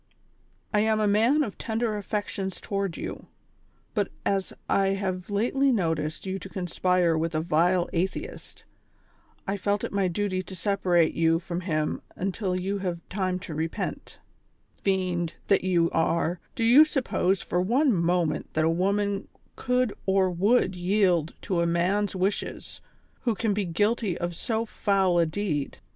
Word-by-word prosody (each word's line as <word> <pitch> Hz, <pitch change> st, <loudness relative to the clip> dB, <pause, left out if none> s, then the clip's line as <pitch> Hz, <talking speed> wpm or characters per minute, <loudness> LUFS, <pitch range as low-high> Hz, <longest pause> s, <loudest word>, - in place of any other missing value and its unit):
"I 210 Hz, -, +4 dB
am 215 Hz, 0 st, +2 dB
a 210 Hz, -, +2 dB
man 230 Hz, +9 st, +4 dB
of 210 Hz, -, -6 dB
tender 225 Hz, -1 st, -1 dB
affections 205 Hz, -2 st, -3 dB
toward 195 Hz, -4 st, -3 dB
you, -, -, -6 dB, 0.7 s
but -, -, +1 dB, 0.2 s
as 195 Hz, -1 st, 0 dB, 0.2 s
I 195 Hz, 0 st, +2 dB
have 185 Hz, -1 st, -3 dB
lately 250 Hz, +7 st, +2 dB
noticed 160 Hz, -7 st, -1 dB
you 190 Hz, 0 st, -3 dB
to 195 Hz, -, -9 dB
conspire 180 Hz, -2 st, +1 dB
with 160 Hz, 0 st, -1 dB
a -, -, +2 dB
vile 170 Hz, +3 st, +2 dB
atheist, 180 Hz, +3 st, -4 dB, 0.8 s
I 195 Hz, 0 st, -1 dB
felt 200 Hz, +1 st, 0 dB
it -, -, -3 dB
my 200 Hz, -2 st, +2 dB
duty 185 Hz, +1 st, -1 dB
to 190 Hz, +1 st, -9 dB
separate 180 Hz, -3 st, +2 dB
you 165 Hz, 0 st, +3 dB
from 170 Hz, +1 st, -4 dB
him 155 Hz, -4 st, -1 dB
until 185 Hz, -1 st, -2 dB
you 195 Hz, +2 st, -2 dB
have 175 Hz, -3 st, -4 dB
time 185 Hz, -2 st, -1 dB
to 175 Hz, -, -7 dB
repent 160 Hz, +2 st, -4 dB, 0.2 s
" -, -, -41 dB
— -, -, -43 dB
" -, -, -38 dB
Fiend, 180 Hz, -4 st, 0 dB
tliat 200 Hz, -, +4 dB
you 175 Hz, -3 st, +2 dB
are, 165 Hz, +1 st, +1 dB, 0.2 s
do 230 Hz, -, -1 dB
you 245 Hz, +7 st, +8 dB
suppose 235 Hz, -, 0 dB
for 180 Hz, -, 0 dB
one 250 Hz, +8 st, +3 dB
moment 170 Hz, -2 st, 0 dB
that 155 Hz, 0 st, +2 dB
a -, -, +3 dB
woman 200 Hz, +3 st, 0 dB, 0.3 s
could 250 Hz, -3 st, 0 dB
or 190 Hz, -1 st, +3 dB
would 195 Hz, +3 st, +2 dB
yield 180 Hz, -3 st, +1 dB
to 180 Hz, -3 st, 0 dB
a 170 Hz, -, +2 dB
man's 190 Hz, +5 st, +1 dB
wishes, 190 Hz, +2 st, -3 dB, 0.4 s
who 235 Hz, -4 st, 0 dB
can 210 Hz, +1 st, 0 dB
be 200 Hz, 0 st, -1 dB
guilty 205 Hz, +2 st, 0 dB
of 175 Hz, 0 st, -3 dB
so 225 Hz, +5 st, -1 dB
foul 195 Hz, -5 st, +1 dB
a 165 Hz, -, +3 dB
deed 155 Hz, -5 st, -2 dB
190 Hz, 165 wpm, -26 LUFS, 175-205 Hz, 0.8 s, you